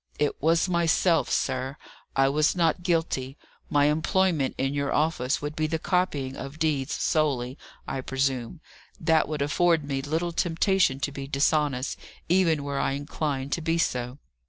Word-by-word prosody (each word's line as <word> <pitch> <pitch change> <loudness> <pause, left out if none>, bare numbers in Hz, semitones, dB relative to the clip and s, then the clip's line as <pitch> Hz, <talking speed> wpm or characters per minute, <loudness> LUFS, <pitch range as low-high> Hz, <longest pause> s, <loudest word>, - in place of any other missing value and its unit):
"It 150 -1 -1
was 165 +4 +3
myself, 170 -1 +2
sir. 130 +2 -1 0.4
I 135 0 +4
was 150 +5 +2
not 170 -1 +2
guilty. 160 -6 -1 0.3
My 145 0 +3
employment 160 -1 +1
in 135 +1 0
your 140 -1 -1
office 145 -4 0
would 150 +1 -4
be 155 0 0
the 160 +1 -1
copying 155 -7 -1
of 140 +3 -7
deeds 150 -4 0
solely, 135 -5 0 0.3
I 135 - -3
presume; 135 +2 -2 0.4
that 160 -1 +3
would 150 -2 -2
afford 165 +2 +2
me 140 -1 -2
little 160 +5 -1
temptation 170 -3 +1
to 145 - -1
be 140 -1 -6
dishonest, 140 -1 0 0.3
even 165 -4 +3
were 140 -1 -2
I - - 0
inclined 140 -1 -3
to 170 - -1
be 165 +1 0
so." 125 -5 -1
150 Hz, 155 wpm, -26 LUFS, 135-165 Hz, 0.4 s, I